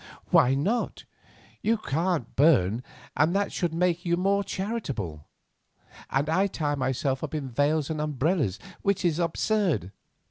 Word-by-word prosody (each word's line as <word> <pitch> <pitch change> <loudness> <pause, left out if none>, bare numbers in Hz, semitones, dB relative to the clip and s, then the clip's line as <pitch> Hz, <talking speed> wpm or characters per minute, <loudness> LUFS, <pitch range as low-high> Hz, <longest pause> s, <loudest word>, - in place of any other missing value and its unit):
"Why 130 +2 +5
not? 205 - -1 0.6
You 225 +1 +2
can't 165 - -1
burn, 120 - +4 0.3
and 155 +6 +2
that 200 0 +1
should 175 -3 0
make 175 +1 +1
you 170 -1 +1
more 200 +2 +2
charitable. 140 - -4 0.8
And 140 +2 0
I 185 +5 +2
tie 150 -6 -2
myself 130 0 -1
up 155 0 -4
in 145 -3 -3
veils 145 +4 +1
and 155 -1 -2
umbrellas, 150 - 0 0.2
which 200 -2 0
is 170 -1 +2
absurd. 170 - 0
155 Hz, 140 wpm, -27 LUFS, 135-185 Hz, 0.8 s, Why